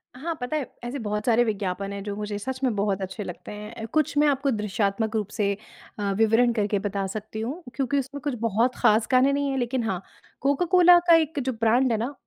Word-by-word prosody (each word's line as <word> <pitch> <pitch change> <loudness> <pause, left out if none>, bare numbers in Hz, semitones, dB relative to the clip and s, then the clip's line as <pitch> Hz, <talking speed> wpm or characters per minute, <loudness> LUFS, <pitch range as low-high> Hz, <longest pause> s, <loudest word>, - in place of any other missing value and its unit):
हाँ 325 +7 -3
पता 250 +5 -2
है, 290 - -2 0.2
ऐसे 245 +4 -4
बहुत 210 -1 -3
सारे 240 0 +4
विज्ञापन 200 -3 -2
हैं 200 - -5
जो 205 0 -4
मुझे 210 0 -4
सच 260 +5 -4
में 255 -3 +2
बहुत 200 -1 0
अच्छे 190 +3 -5
लगते 180 -3 -8
हैं। 210 +2 -7
कुछ 305 -2 +1
मैं 295 +1 +5
आपको 275 -1 +1
दृश्यात्मक 210 0 -1
रूप 210 -3 0
से 200 -2 0 0.5
अ, 200 -1 0
विवरण 225 +2 +4
करके 210 -2 0
बता 200 -1 -2
सकती 215 +2 -6
हूँ। 280 +11 -5
क्योंकि 275 +1 0
उसमें 275 +2 -6
कुछ 290 - -1
बहुत 230 +2 +1
खास 215 +1 +3
गाने 260 +2 +4
नहीं 285 0 0
है 270 - -1
लेकिन 245 0 -1
हाँ 190 -5 -2 0.4
कोका-कोला 350 +6 +5
का 335 - +8
एक 320 -2 +1
जो 260 -1 -1
ब्रांड 240 +3 +3
है 225 - +2
ना 240 +6 -3
230 Hz, 220 wpm, -25 LUFS, 210-270 Hz, 0.5 s, का